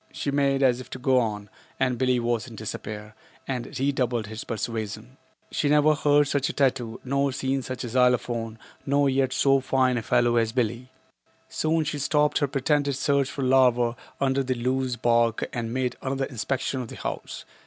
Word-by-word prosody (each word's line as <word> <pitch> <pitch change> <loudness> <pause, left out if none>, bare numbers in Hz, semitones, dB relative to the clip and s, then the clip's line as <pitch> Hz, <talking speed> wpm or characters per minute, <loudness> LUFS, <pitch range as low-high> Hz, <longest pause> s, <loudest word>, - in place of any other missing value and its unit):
She 140 - -3
made 140 -1 +2
as 125 -1 +3
if 130 - -12
to - - -6
go 130 0 +3
on, 105 -3 -2 0.3
and 130 -2 +1
Billie 130 -1 +2
was 120 -1 -1
in 115 - -10
despair, 105 0 -6 0.3
and 125 -2 -4
redoubled 125 -4 0
his 110 +1 -7
persuasion. 115 +1 -5 0.3
She 150 - 0
had 150 - +5
never 150 +1 +5
heard 145 0 +3
such 140 -1 0
a - - -4
tattoo, 125 -4 0
nor 140 +1 0
seen 135 +1 -1
such 130 +1 -5
a - - -4
186 115 - -8 0.3
xylophone, 115 -2 -4 0.3
nor 140 0 +2
yet 130 -1 +1
so 135 +1 +3
fine 130 -1 +1
a - - -5
fellow 120 +1 +2
as 115 -1 +1
Billie. 120 +1 -1 0.6
Soon 160 +1 0
she 150 -1 -3
stopped 150 +1 +2
her 145 - +1
pretended 140 +1 0
search 140 0 +1
for 140 - -4
larvae 125 -2 +3 0.2
under 135 0 +1
the 130 -1 -1
loose 130 +1 -1
bark 115 -1 +2
and 115 -1 -3
made 125 0 -1
another 135 0 -1
inspection 130 +1 -2
of 125 - -6
the - - -9
house. - - -6
130 Hz, 190 wpm, -25 LUFS, 120-140 Hz, 0.6 s, had